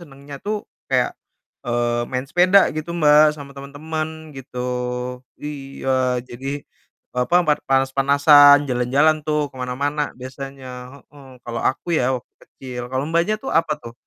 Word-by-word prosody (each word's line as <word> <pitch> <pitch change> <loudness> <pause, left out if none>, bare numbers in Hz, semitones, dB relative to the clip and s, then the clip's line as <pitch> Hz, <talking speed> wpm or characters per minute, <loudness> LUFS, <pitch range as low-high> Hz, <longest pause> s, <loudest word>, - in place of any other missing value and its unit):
senangnya 140 -3 -11
tuh 210 0 -2 0.2
kayak, - - +1 0.6
eee, 120 0 0
main 130 0 -2
sepeda 180 +7 +4
gitu, 155 +2 -4
Mbak, 150 -1 +5
sama 140 -2 -10
teman-teman, 155 +3 -6
gitu. 130 -1 -9 0.8
Iya, 140 -2 -7 0.4
jadi, 130 +3 -7 0.7
apa, 125 +7 +2
part 150 - +1
panas-panasan, 140 +2 +5
jalan-jalan 130 +5 +3
tuh 150 -1 0
ke - - -28
mana-mana 145 +4 -2
biasanya, 135 +1 -8 0.4
heeh, 140 -2 -15 0.2
kalau 120 -1 -4
aku 135 - -1
ya 130 +1 +1
waktu 120 - -25
kecil. 125 -2 -8
Kalau, 130 +1 0
Mbaknya, 170 +6 +2
tuh 270 - -4
apa 165 -1 +2
tuh, 115 - -9
140 Hz, 135 wpm, -21 LUFS, 130-155 Hz, 0.8 s, Mbak